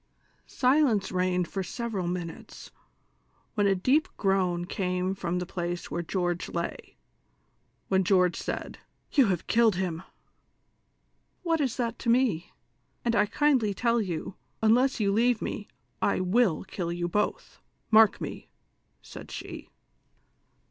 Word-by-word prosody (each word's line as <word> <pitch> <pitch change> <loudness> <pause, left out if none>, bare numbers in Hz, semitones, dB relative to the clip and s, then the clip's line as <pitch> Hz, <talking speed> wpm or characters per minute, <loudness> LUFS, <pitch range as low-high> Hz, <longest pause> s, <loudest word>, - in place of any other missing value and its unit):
Silence 255 -7 +2
reigned 180 -1 +1
for 195 - -3
several 200 -1 -3
minutes, 175 -2 -6 0.8
wlien 205 -2 +3
a 195 - +3
deep 260 +12 +2
groan 185 -3 +1
came 180 0 -1
from 180 -2 -2
the 180 - -2
place 175 -1 -4
where 170 - -2
William 175 -1 +1 0.2
lay, 170 0 -5 0.9
when 190 0 +2
George 180 -1 +3
said: - - -5 0.2
" - - -44
You 270 -6 +5
have 180 -4 -1
killed 225 -3 +3
him! 175 -3 -2 0.4
" - - -45
" - - -43
AVhat 330 -2 +2
is 260 -4 -1
that 235 -2 -2
to 235 - -2
me 230 -9 +2 0.2
':* - - -44
and 235 - +2
T 210 -2 +3
kindly 255 -7 +2
tell 235 +1 +2
you, 180 -2 -4 0.3
unless 245 +5 +4
you 200 -2 +2
leave 235 +1 +3
me, 210 - -4 0.3
I - - +2
will 185 -1 +2
kill 180 -2 -4
you 175 0 -2
botli, 210 +4 -2 0.3
mark 220 -1 +6
m<^^ - - -7 0.3
!" - - -45
said - - -10
f;1ie. - - -8
195 Hz, 150 wpm, -28 LUFS, 180-235 Hz, 0.9 s, mark